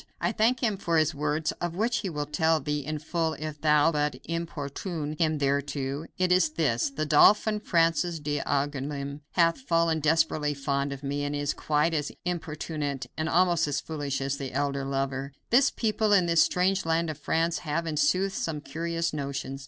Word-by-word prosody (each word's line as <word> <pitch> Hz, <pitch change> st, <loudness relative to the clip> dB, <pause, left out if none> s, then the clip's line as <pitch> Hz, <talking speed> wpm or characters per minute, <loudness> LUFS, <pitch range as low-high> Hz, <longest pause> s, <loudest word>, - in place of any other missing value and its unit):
I -, -, 0 dB
thank 235 Hz, +3 st, +2 dB
him 215 Hz, -4 st, +1 dB
for 170 Hz, -3 st, 0 dB
his 155 Hz, -1 st, +2 dB
words, 150 Hz, +2 st, -1 dB
of 175 Hz, -1 st, -2 dB
which 230 Hz, +5 st, +1 dB
he 195 Hz, -, -3 dB
will 150 Hz, -3 st, -3 dB
tell 160 Hz, +1 st, +2 dB
thee 150 Hz, +1 st, -2 dB
in 155 Hz, +2 st, -4 dB
full 160 Hz, +1 st, -1 dB
if 155 Hz, -1 st, -6 dB
thou 150 Hz, 0 st, +4 dB
but 150 Hz, -1 st, 0 dB
importune 160 Hz, -1 st, -4 dB
him 155 Hz, -2 st, +2 dB
thereto. 140 Hz, +1 st, -1 dB
It 185 Hz, -1 st, +1 dB
is 180 Hz, -3 st, +4 dB
this: 145 Hz, -8 st, +1 dB
the 145 Hz, +3 st, -3 dB
Dauphin, 210 Hz, +8 st, +5 dB
Francis 165 Hz, -2 st, +1 dB
d'Angouleme, 145 Hz, -1 st, -2 dB
hath 170 Hz, +6 st, +3 dB
fallen 165 Hz, -8 st, +1 dB
desperately 155 Hz, -1 st, +1 dB
fond 140 Hz, 0 st, -1 dB
of 140 Hz, 0 st, -7 dB
me, 145 Hz, +1 st, -2 dB
and 145 Hz, 0 st, -2 dB
is 145 Hz, 0 st, -1 dB
quite 150 Hz, +2 st, +1 dB
as 150 Hz, -2 st, -1 dB
importunate, 150 Hz, -5 st, -3 dB
and 160 Hz, 0 st, -2 dB
almost 175 Hz, -2 st, +3 dB
as 145 Hz, -, -1 dB
foolish 145 Hz, -4 st, -4 dB
as 135 Hz, +1 st, -1 dB
the 135 Hz, -3 st, -6 dB
elder 140 Hz, 0 st, -1 dB
lover. 135 Hz, 0 st, -2 dB, 0.2 s
This 265 Hz, +3 st, +5 dB
people, 215 Hz, -2 st, 0 dB
in 185 Hz, -3 st, +5 dB
this 170 Hz, -1 st, +4 dB
strange 185 Hz, +1 st, +2 dB
land 165 Hz, 0 st, 0 dB
of 150 Hz, -, -10 dB
France, 165 Hz, +2 st, 0 dB
have, 165 Hz, +1 st, -2 dB
in 160 Hz, -2 st, -3 dB
sooth, 190 Hz, +5 st, +2 dB
some 160 Hz, -5 st, -2 dB
curious 165 Hz, +4 st, -3 dB
notions. 140 Hz, -2 st, -4 dB
155 Hz, 185 wpm, -27 LUFS, 145-170 Hz, 0.2 s, Dauphin